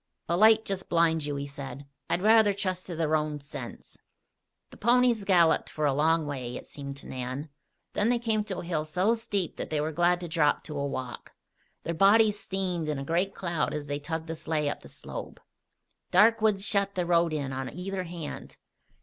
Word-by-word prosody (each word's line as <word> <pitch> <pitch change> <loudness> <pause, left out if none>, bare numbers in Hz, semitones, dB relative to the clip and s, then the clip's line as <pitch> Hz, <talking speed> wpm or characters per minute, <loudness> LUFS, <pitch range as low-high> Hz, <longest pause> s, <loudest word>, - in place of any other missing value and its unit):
"A 170 - +1
light 220 +3 +6
just 195 -1 -4
blinds 165 -3 +2
you," 145 - -2
he 140 0 -3
said. 140 -1 -8 0.2
"I'd 180 - 0
rather 215 -2 +5
trust 185 -2 -3
to 175 - -5
the 160 -1 0
roans' 150 -2 -1
sense." 145 - -9 0.7
The - - -12
ponies 240 -2 +3
galloped 175 -4 +4
for 155 - -2
a 140 - +3
long 160 +3 +2
way, 130 -4 -4
it - - -10
seemed 140 -1 -8
to - - -12
Nan; 130 +4 -5 0.4
then 210 - +1
they 245 - +3
came 220 -3 0
to 195 -3 -4
a - - -5
hill 165 -3 -1
so 180 +8 +1
steep 205 -6 -2
that - - -5
they 155 - 0
were 155 +2 -1
glad 175 +2 +2
to 175 - -4
drop 155 -2 +2
to 150 -2 -5
a 140 - -1
walk. 130 -3 -6 0.5
Their 170 - -2
bodies 210 +4 +5
steamed 180 -5 -2
in 150 - -1
a 135 - -5
great 180 +6 0
cloud 170 -5 -1
as 150 -1 -4
they 145 0 -3
tugged 160 +2 -4
the 165 - -4
sleigh 155 -2 -1
up - - -4
the - - -14
slope. - - -8 0.7
Dark 225 +1 +5
woods 210 -2 +2
shut 200 -2 +1
the 180 -1 0
road 170 -1 +3
in 140 -3 -2
on 130 -1 -3
either 185 +2 -4
hand. 170 -3 -7
170 Hz, 210 wpm, -28 LUFS, 150-195 Hz, 0.7 s, light